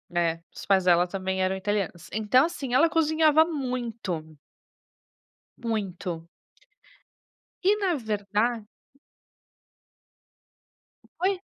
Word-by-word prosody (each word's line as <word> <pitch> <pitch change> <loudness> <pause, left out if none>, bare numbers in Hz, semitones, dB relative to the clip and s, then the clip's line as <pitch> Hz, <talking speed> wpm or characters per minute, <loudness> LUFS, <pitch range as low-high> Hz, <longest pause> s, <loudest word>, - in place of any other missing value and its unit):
É, 165 -1 +1
os - - -9
pais 195 -2 +3
dela 175 0 +5
também 190 0 -2
eram 185 +1 +1
italianos. 190 -3 -3
Então 220 +6 +4
assim, 280 -7 -4
ela 325 +6 +5
cozinhava 315 -1 +4
muito. 235 - -4 1.2
Muito. 190 -7 -4 1.4
E 385 - +5
na 385 -5 +1
verda 215 -1 -1 2.6
Oi? 380 +1 +1
215 Hz, 90 wpm, -26 LUFS, 185-290 Hz, 2.6 s, dela